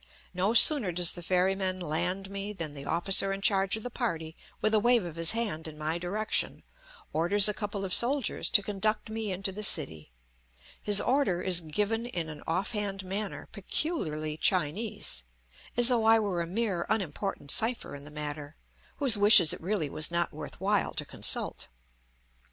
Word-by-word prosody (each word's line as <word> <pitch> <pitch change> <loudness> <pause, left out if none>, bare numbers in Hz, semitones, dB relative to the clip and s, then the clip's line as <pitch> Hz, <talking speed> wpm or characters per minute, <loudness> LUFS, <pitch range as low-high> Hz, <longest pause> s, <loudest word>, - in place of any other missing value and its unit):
No 190 +5 -1
sooner 240 - +7
does 175 0 +2
the 175 - -9
ferryman 185 +1 0
land 180 +4 -3
me 200 +1 -6
than 165 -6 -7
the 140 -1 -10
officer 195 +3 +2
in 195 - -3
charge 195 0 +1
of 220 - -10
the 245 - -7
party, 165 -11 -4 0.2
with 215 - 0
a 215 - +4
wave 240 0 +2
of 170 -3 -8
his 165 +2 +4
hand 205 -9 -3
in 155 -1 -11
my 155 +2 -3
direction, 205 +5 -1 0.5
orders 195 +6 +4
a 210 - +1
couple 205 -1 -5
of 185 - -3
soldiers 270 +3 +2
to 205 -4 +4
conduct 215 +2 -3
me 220 -2 -4
into 195 +1 -4
the 205 +3 -8
city; 110 - +2 0.7
his 205 -1 +4
order 245 -9 0
is 180 -2 +3
given 210 +9 -3
in 170 -8 -5
an 150 -1 -10
off 185 +4 -2
hand 200 -3 -4
manner 200 +2 -4
peculiarly 165 - -3
Chinese, 175 - -1 0.6
as 240 -1 +6
though 240 -3 +1
I 225 0 +5
were 200 -5 -2
a 170 - -4
mere 190 -2 -2
unimportant 195 -6 -2
cipher 230 +2 +2
in 140 - -11
the 145 - -12
matter, 150 0 -7 0.4
whose 265 -7 +4
wishes 205 -5 +7
it - - -9
really 175 -3 -2
was 155 +2 0
not 170 0 -2
worth 155 - -8
while 200 +2 -1
to - - -3
consult. - - +1
195 Hz, 180 wpm, -28 LUFS, 165-215 Hz, 0.7 s, sooner